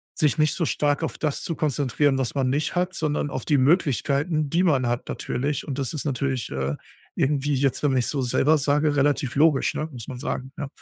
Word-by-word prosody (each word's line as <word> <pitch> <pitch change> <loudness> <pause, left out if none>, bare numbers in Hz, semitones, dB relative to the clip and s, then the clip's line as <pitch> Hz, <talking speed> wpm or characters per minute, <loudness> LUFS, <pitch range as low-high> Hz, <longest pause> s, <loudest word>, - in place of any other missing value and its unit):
sich 155 +1 +1
nicht 155 0 +3
so 170 - 0
stark 145 +1 0
auf 160 - -4
das 150 -3 -2
zu 170 - -3
konzentrieren, 145 -1 +1
was 130 -3 -1
man 130 -2 +1
nicht 145 +6 -1
hat, 180 +1 0
sondern 150 -1 -1
auf 130 -2 -5
die 150 - +3
Möglichkeiten, 150 - +1
die 170 +4 +2
man 135 -8 +2
hat 120 0 -2
natürlich. 140 +3 -3
Und 140 -3 -4
das 135 0 -2
ist 155 - -4
natürlich, 135 -3 -2
äh, 65 +1 -2 0.4
irgendwie 145 +1 +1
jetzt, 135 +1 0
wenn 140 -3 +2
ich 120 - +1
es - - -2
so 140 -3 -1
selber 145 +5 +3
sage, 145 +1 +1
relativ 140 -2 +1
logisch, 150 -1 +3
ne, 155 - -2
muss 120 -5 -8
man 130 - -6
sagen, 130 +1 -4
ja. 145 - -4
145 Hz, 220 wpm, -24 LUFS, 130-155 Hz, 0.4 s, nicht